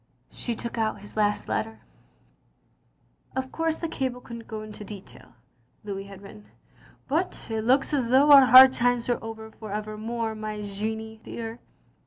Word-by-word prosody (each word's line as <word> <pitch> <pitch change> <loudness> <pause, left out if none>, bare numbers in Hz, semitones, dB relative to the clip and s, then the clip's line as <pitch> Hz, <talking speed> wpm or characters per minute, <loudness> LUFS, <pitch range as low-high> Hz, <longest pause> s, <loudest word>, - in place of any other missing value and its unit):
She 235 - -4
took 235 +1 -5
out 215 -2 -1
his 205 - -13
last 210 -1 +1
letter. 225 0 -3 1.6
"0/ 260 0 -2
course 325 -1 -1
the 335 - -3
cable 260 -5 -3
couldn't 235 -2 -10
go 215 -1 -6
into 215 0 -8
detail'^ 190 - -12 0.5
(Louis 195 -1 -5
had 200 0 -12
written), 205 +1 -13 0.6
''but 320 -4 -2
it 220 0 -1
looks 260 +6 +2
as 255 -5 +1
though 275 +4 +5
our 275 -2 +9
hard 260 +1 +10
times 245 -1 +1
were 240 -2 -1
over 220 0 -8
for 215 -1 -10
evermore^ 215 +2 -3
my 215 -1 -5
Jeannie 220 +2 -5
dear. 230 +1 -6
225 Hz, 160 wpm, -26 LUFS, 215-250 Hz, 1.6 s, hard